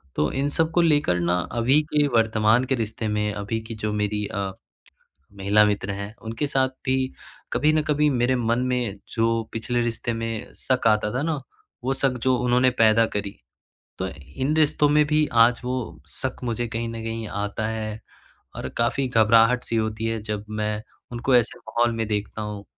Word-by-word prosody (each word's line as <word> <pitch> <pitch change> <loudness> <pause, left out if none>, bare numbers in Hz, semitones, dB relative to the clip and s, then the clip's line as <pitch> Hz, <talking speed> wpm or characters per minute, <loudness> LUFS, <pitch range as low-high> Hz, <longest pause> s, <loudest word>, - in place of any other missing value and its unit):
तो 75 - +1
इन 135 +2 0
सब 160 +2 +1
को 175 - +4
लेकर 145 - +3
ना 85 +1 +1 0.2
अभी 130 +6 +4
के 150 -1 +4
वर्तमान 110 +1 +3
के 130 - 0
रिश्ते 110 -1 -3
में, 105 0 0
अभी 100 +3 -3
की 115 0 -7
जो 105 - 0
मेरी 105 0 -1
अ, 100 -2 -3 0.9
महिला 100 +2 +4
मित्र 100 -1 -1
हैं 100 +1 -5
उनके 115 +6 -3
साथ 135 -1 +2 0.2
भी 130 0 +2 0.6
कभी 150 +3 +3
न 155 - +3
कभी 150 0 +2
मेरे 125 -1 +2
मन 115 -1 +1
में 120 -5 -1 0.2
जो 115 0 +2
पिछले 120 +2 -1
रिश्ते 120 0 -2
में 115 -1 -4
शक 130 -3 +1
आता 105 -1 +2
था 125 - -1
ना, 155 -3 -1 0.4
वो 130 +2 +1
शक 135 -1 0
जो 130 -1 +3
उन्होंने 125 +1 +3
पैदा 110 +1 +5
करी। 100 -1 -4 0.6
तो 95 - -2
इन 80 - -3
रिश्तों 150 -1 +3
में 150 +1 +4
भी 150 0 +2 0.2
आज 120 0 -2
वो 125 +1 -1 0.3
शक 75 - -4
मुझे 120 0 -1
कहीं 115 +1 -3
न 115 0 -6
कहीं 115 0 -4 0.2
आता 105 +2 -3
है 110 -1 -4 0.6
और - - -4
काफ़ी 120 +3 +1
घबराहट-सी 115 +1 +4
होती 110 0 -1
है 115 -1 -1
जब 105 -1 -4
मैं 105 0 -2 0.3
उनको 120 +2 0
ऐसे 120 -2 +1
माहौल 120 0 0
में 115 -1 -1
देखता 105 0 -3
हूँ। 105 -1 -6
115 Hz, 185 wpm, -24 LUFS, 105-130 Hz, 0.9 s, पैदा